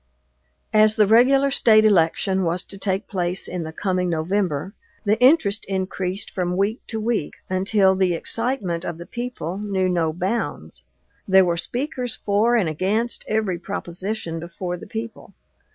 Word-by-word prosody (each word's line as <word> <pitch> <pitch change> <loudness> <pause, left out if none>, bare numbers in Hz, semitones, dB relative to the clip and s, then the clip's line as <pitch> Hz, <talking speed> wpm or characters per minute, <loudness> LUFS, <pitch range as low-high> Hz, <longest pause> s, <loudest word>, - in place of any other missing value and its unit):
As 215 0 +5
the 210 - +4
regular 265 +6 +4
State 220 -5 +5
election 190 0 +2
was 175 +2 0
to 195 - -9
take 195 +1 -1
place 180 -2 0
in 180 -1 -4
the 160 -1 -5
coming 180 +1 -1
November, 175 0 -1 0.3
the 210 +2 +2
interest 250 -6 +4
increased 190 0 -3
from 180 -1 -2
week 205 +5 0
to 225 - -4
week, 220 -8 -2 0.2
until 190 +1 +3
the 185 -2 +1
excitement 205 -4 -1
of 170 -3 -4
the 170 - -9
people 235 -8 -5
knew 195 -3 -1
no 170 -3 +1
bounds. 165 - -4 0.4
There 190 -1 +6
were 170 -1 +1
speakers 245 - -3
for 215 +4 +1
and 210 -8 +2
against 200 +9 -1
every 210 -5 -1
proposition 180 -1 -4
before 175 +2 -5
the 200 +5 -10
people. 225 +2 -7
195 Hz, 150 wpm, -22 LUFS, 175-220 Hz, 0.4 s, There